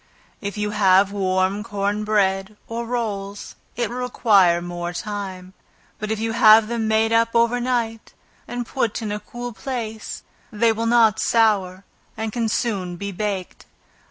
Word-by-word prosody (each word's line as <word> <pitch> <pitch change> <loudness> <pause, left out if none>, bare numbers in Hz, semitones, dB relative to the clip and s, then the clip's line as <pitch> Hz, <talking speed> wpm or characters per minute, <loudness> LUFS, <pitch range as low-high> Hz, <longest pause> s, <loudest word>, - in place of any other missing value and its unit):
If 200 0 -5
you 210 0 -1
have 195 -1 +4
warm 190 0 0
corn 205 -1 -2
bread, 200 -1 0
or 230 +1 -4
rolls, 205 -4 -4 0.2
it 240 -1 0
will 245 - -5
require 205 -8 +3
more 175 0 -5
time; 190 -2 -6 0.5
but 215 - -4
if 220 -1 -1
you 225 0 -1
have 220 -1 +6
them 230 -1 -2
made 220 +1 +2
up 230 0 +2
over 235 +1 +3
night, 235 -3 -2 0.3
and 245 0 -4
put 235 -3 -2
in 210 - -3
a 210 - -3
cool 240 +3 -7
place, 225 -4 -5 0.3
they 225 +1 +3
will 225 +1 -2
not 230 -3 +4
sour, 200 -5 +2 0.3
and 220 -1 -3
can 230 -2 0
soon 195 -6 -1
be 200 +3 -5
baked. 195 -1 -4
215 Hz, 155 wpm, -22 LUFS, 195-230 Hz, 0.5 s, have